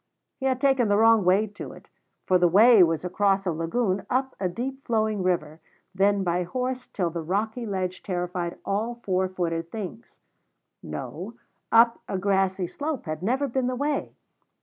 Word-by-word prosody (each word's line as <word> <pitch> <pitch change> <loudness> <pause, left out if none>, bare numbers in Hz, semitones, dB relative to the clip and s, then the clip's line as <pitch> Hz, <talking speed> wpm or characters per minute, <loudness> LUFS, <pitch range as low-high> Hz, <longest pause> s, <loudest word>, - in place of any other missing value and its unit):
He 265 - 0
had 260 -1 0
taken 270 -4 +3
the 205 0 +3
wrong 225 -1 +5
way 190 +4 +4
to 205 -1 -9
it, - - -15 0.4
for 185 -1 +3
the 175 - +5
way 215 +5 +7
was 165 0 +2
across 195 +1 +1
a 180 - +1
lagoon, 185 +5 -1
up 265 +1 0
a 185 - 0
deep 265 +8 -5
flowing 220 -3 0
river, 165 -4 -1 0.3
then 200 +1 +2
by 175 0 0
horse 250 +7 -3
till 175 -4 -2
the 170 0 -4
rocky 220 +8 -2
ledge 185 -2 -3
terrified 175 -2 -3
all 215 +4 -1
four 185 -1 0
footed 170 -2 -3
things; 190 - -8 0.6
no, 195 +8 -7 0.4
up 230 +1 +5
a 195 - -1
grassy 190 -1 +1
slope 290 - -4
had 155 0 -4
never 260 +8 0
been 260 0 -1
the 255 - -1
way. 285 +2 -2
195 Hz, 170 wpm, -26 LUFS, 180-235 Hz, 0.6 s, way